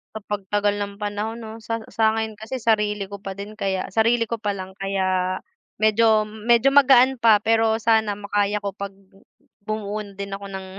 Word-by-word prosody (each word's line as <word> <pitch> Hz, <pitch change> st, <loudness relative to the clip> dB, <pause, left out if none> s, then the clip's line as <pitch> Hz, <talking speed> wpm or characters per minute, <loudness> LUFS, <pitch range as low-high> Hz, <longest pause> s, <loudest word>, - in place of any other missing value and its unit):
Sa -, -, -4 dB
pag 205 Hz, -1 st, -3 dB
tagal 205 Hz, 0 st, +2 dB
ng 200 Hz, 0 st, -5 dB
panahon 210 Hz, +2 st, -3 dB
'no, 220 Hz, 0 st, -9 dB
sa 230 Hz, +1 st, -3 dB
sa 220 Hz, -1 st, +2 dB
akin 220 Hz, -1 st, -3 dB
kasi, 220 Hz, +5 st, -6 dB
sarili 210 Hz, -3 st, +1 dB
ko 200 Hz, -, -8 dB
pa 195 Hz, -, -5 dB
din 200 Hz, +2 st, -8 dB
kaya 190 Hz, -2 st, -2 dB
sarili 230 Hz, +1 st, +3 dB
ko 230 Hz, -, -2 dB
pa 210 Hz, -2 st, -2 dB
lang 190 Hz, -1 st, -7 dB
kaya 185 Hz, -1 st, -1 dB, 0.4 s
medyo 215 Hz, 0 st, +4 dB
medyo 230 Hz, +4 st, +2 dB
magaan 265 Hz, -2 st, +6 dB
pa 225 Hz, -3 st, +5 dB
pero 225 Hz, 0 st, +2 dB
sana 220 Hz, -1 st, +2 dB
makaya 205 Hz, 0 st, 0 dB
ko 200 Hz, -1 st, -5 dB
'pag 200 Hz, 0 st, -5 dB, 0.7 s
bumuo 215 Hz, 0 st, -3 dB
din 200 Hz, 0 st, -6 dB
ako 200 Hz, 0 st, -9 dB
ng 190 Hz, 0 st, -6 dB
210 Hz, 185 wpm, -23 LUFS, 200-225 Hz, 0.7 s, magaan